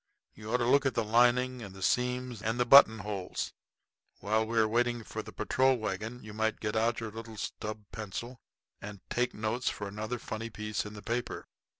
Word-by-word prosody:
You 110 Hz, +1 st, -8 dB
ought 125 Hz, -, +3 dB
to 120 Hz, -, 0 dB
look 140 Hz, +3 st, +4 dB
at 135 Hz, -, -2 dB
the 115 Hz, -, +2 dB
lining 120 Hz, +3 st, +3 dB
and 95 Hz, -3 st, -8 dB
seams 125 Hz, +1 st, 0 dB
and 115 Hz, +3 st, -1 dB
the 125 Hz, -, +3 dB
button 120 Hz, -3 st, +9 dB
holes. 100 Hz, -3 st, -3 dB, 0.7 s
While 110 Hz, +2 st, +1 dB
we 115 Hz, +1 st, -2 dB
are 110 Hz, -1 st, +5 dB
waiting 120 Hz, +1 st, +1 dB
for 110 Hz, -, -5 dB
the -, -, -10 dB
patrol 130 Hz, +5 st, +2 dB
wagon 110 Hz, +3 st, -4 dB
you 105 Hz, -1 st, -9 dB
might 110 Hz, +1 st, 0 dB
get 105 Hz, 0 st, -2 dB
out 115 Hz, +1 st, +2 dB
your 110 Hz, -2 st, -4 dB
little 115 Hz, 0 st, -8 dB
stub 110 Hz, +1 st, -5 dB
pencil 115 Hz, +3 st, -6 dB, 0.4 s
and 100 Hz, -2 st, -8 dB
take 125 Hz, +1 st, 0 dB
notes 110 Hz, +3 st, -1 dB
for 105 Hz, -, -5 dB
another 110 Hz, +4 st, -4 dB
funny 115 Hz, 0 st, -5 dB
piece 105 Hz, -1 st, -3 dB
in 105 Hz, -, -9 dB
the 105 Hz, -, -10 dB
paper." 120 Hz, +1 st, -3 dB
110 Hz, 200 wpm, -31 LUFS, 105-120 Hz, 0.7 s, button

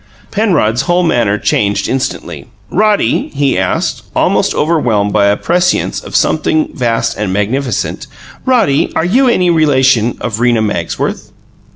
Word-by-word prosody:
Penrod's 150 Hz, -, +1 dB
whole 175 Hz, +1 st, +3 dB
manner 115 Hz, -10 st, +1 dB
changed 100 Hz, -1 st, 0 dB
instantly. 130 Hz, 0 st, -4 dB, 0.2 s
"Roddy," 205 Hz, -, +1 dB
he 140 Hz, -1 st, +1 dB
asked, 95 Hz, 0 st, -1 dB
almost -, -, +1 dB
overwhelmed 120 Hz, -11 st, 0 dB
by 100 Hz, -1 st, +3 dB
a 100 Hz, 0 st, +2 dB
prescience 180 Hz, +1 st, 0 dB
of -, -, -8 dB
something 315 Hz, -2 st, +1 dB
vast 115 Hz, -3 st, -1 dB
and 105 Hz, -2 st, -2 dB
magnificent, 110 Hz, +5 st, -2 dB, 0.4 s
"Roddy, 225 Hz, -, +2 dB
are 160 Hz, -, +1 dB
you 255 Hz, +9 st, +2 dB
any 180 Hz, -7 st, +2 dB
relation 135 Hz, -7 st, +2 dB
of 115 Hz, -2 st, -4 dB
Rena 120 Hz, -2 st, +2 dB
Magsworth?" 105 Hz, -1 st, -3 dB
130 Hz, 135 wpm, -13 LUFS, 105-175 Hz, 0.4 s, whole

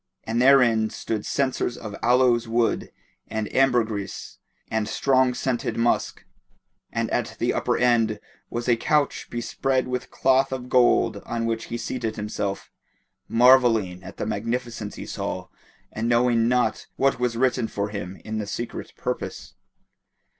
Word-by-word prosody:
And 115 Hz, +2 st, -1 dB
therein 120 Hz, -5 st, +5 dB
stood 110 Hz, -1 st, -4 dB
censers 130 Hz, -3 st, -1 dB
of 110 Hz, -3 st, -7 dB
aloes 120 Hz, -1 st, +3 dB
wood 115 Hz, 0 st, 0 dB, 0.4 s
and 110 Hz, -1 st, -3 dB
ambergris 115 Hz, -6 st, 0 dB, 0.3 s
and 110 Hz, -1 st, -1 dB
strong 130 Hz, 0 st, +2 dB
scented 125 Hz, -2 st, -2 dB
musk, 120 Hz, +1 st, 0 dB, 0.7 s
and -, -, -1 dB
at -, -, -1 dB
the -, -, 0 dB
upper -, -, 0 dB
end 115 Hz, -3 st, +2 dB, 0.3 s
was 120 Hz, +1 st, -4 dB
a 120 Hz, -, +5 dB
couch 145 Hz, +5 st, 0 dB
bespread 130 Hz, +2 st, -1 dB
with 125 Hz, 0 st, -3 dB
cloth 135 Hz, +1 st, +2 dB
of 125 Hz, -1 st, -5 dB
gold 125 Hz, -1 st, +4 dB
on 115 Hz, -1 st, -2 dB
which 115 Hz, 0 st, -2 dB
he 120 Hz, -, -4 dB
seated 115 Hz, -2 st, -3 dB
himself, 105 Hz, -2 st, -4 dB, 0.6 s
marvelling 115 Hz, -7 st, +4 dB
at 95 Hz, -, -10 dB
the -, -, -3 dB
magnificence 115 Hz, 0 st, -3 dB
he -, -, -7 dB
saw -, -, -4 dB, 0.4 s
and 115 Hz, +2 st, -2 dB
knowing 120 Hz, -1 st, +3 dB
not 125 Hz, -2 st, +1 dB
what 135 Hz, -1 st, +1 dB
was 125 Hz, -2 st, 0 dB
written 125 Hz, -2 st, +1 dB
for 100 Hz, -1 st, -3 dB
him 95 Hz, -2 st, -6 dB
in 110 Hz, 0 st, -3 dB
the 105 Hz, -, -4 dB
Secret 120 Hz, +3 st, -5 dB
Purpose. -, -, -5 dB
120 Hz, 145 wpm, -24 LUFS, 110-125 Hz, 0.7 s, therein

